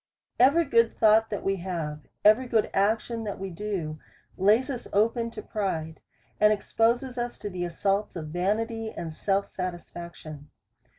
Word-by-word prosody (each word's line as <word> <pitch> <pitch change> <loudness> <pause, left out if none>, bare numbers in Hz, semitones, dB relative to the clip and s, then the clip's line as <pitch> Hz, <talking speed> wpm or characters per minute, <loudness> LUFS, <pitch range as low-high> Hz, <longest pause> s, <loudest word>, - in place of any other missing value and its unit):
Every 285 +7 +5
good 230 -4 +3
thought 220 +1 +5
that 205 - -4
we 195 0 0
have, 165 -5 -4 0.2
every 220 +5 +6
good 225 -3 +1
ac 210 +3 +3
tion 230 -1 -5
that 205 - -4
we 195 0 -5
do, 170 -5 -4 0.4
lays 215 +8 +3
us 250 - -5
open 230 +3 +2
to - - -8
pride, 165 -6 -3 0.4
and 210 0 +6
exposes 235 +4 +1
us 240 0 -3
to 205 - -6
the 180 -1 -3
assaults 195 +4 -1
of 155 -3 -5
vanity 220 +6 -1
and 170 -6 -6
self 195 +4 0
satisfaction. 170 -4 -7
205 Hz, 160 wpm, -27 LUFS, 175-225 Hz, 0.4 s, every